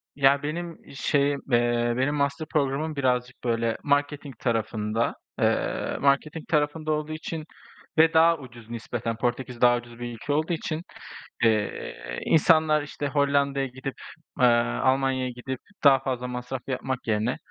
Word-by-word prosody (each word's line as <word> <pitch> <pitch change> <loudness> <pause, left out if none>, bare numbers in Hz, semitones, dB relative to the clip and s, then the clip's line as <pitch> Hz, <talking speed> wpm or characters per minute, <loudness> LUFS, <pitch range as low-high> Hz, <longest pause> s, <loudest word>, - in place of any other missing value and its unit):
Ya 140 0 +4
benim 165 +3 -4 0.2
şeyim, 140 0 +1
eee, 120 0 +2
benim 140 +3 +1
master 140 +2 -1
programım 150 +1 0
birazcık, 125 -2 -1
böyle, 115 -1 0
marketing 145 -2 0
tarafında. 115 -1 -1 0.2
Eee, - - 0
marketing 145 +3 +1
tarafında 155 0 0
olduğu 155 0 -1
için 155 0 -5 0.5
ve 160 +1 +6
daha 165 +1 +6
ucuz 120 -5 -13
nispeten 115 0 -3
Portekiz 120 0 -2
daha 120 0 +6
ucuz 120 0 -10
bir 120 0 -5
ülke 130 +6 -3
olduğu 155 +4 +1
için, 155 0 -3 0.6
eee, 105 - -1
insanlar, 155 -1 +4
işte, 145 0 -4
Hollanda'ya 140 -1 +2
gidip, 130 +1 -6 0.4
eee, 125 - +6 0.4
Almanya'ya 130 -1 +2
gidip 125 +1 -6 0.2
daha 135 -2 +7
fazla 125 -2 -3
masraf 125 +1 -5
yapmak 130 -1 -3
yerine 110 +3 +1
135 Hz, 135 wpm, -26 LUFS, 120-150 Hz, 0.6 s, daha